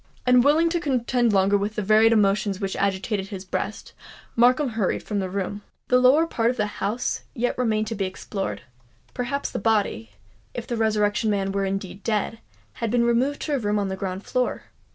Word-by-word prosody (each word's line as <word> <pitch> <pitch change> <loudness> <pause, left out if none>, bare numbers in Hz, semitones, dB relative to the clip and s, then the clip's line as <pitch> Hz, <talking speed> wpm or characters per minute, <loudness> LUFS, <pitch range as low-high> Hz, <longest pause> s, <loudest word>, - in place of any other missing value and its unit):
Unwilling 285 +7 +5
to 345 +1 0
contend 250 -5 +1
longer 195 0 +3
with 205 +2 -1
the 210 - -2
varied 215 +3 +5
emotions 200 -2 +2
which 195 -1 -3
agitated 195 0 -1
his 195 -2 -7
breast, 195 +3 -4 0.4
Markham 250 +4 +4
hurried 220 -4 -1
from 205 -2 -2
the 190 -1 -2
room. 200 +2 -3 0.3
The 250 - +5
lower 265 +6 +5
part 230 -7 0
of 250 - -2
the 210 - +1
house 210 +3 -2
yet 245 +1 0
remained 220 -3 0
to 220 - -4
be 195 -3 -2
explored:—perhaps 185 - -5
the - - -3
body—if 110 - -3
the 240 - -3
Resurrection 215 -1 +1
Man 195 -2 0
were 195 0 -1
indeed 195 0 -4
dead—had 225 +1 -4
been 235 +1 +2
removed 250 +5 +1
to 300 - -2
a 280 - +1
room 210 -2 0
on 200 -1 -1
the 190 - -3
ground 190 0 -4
floor? 250 -1 -1
210 Hz, 180 wpm, -24 LUFS, 195-240 Hz, 0.4 s, Unwilling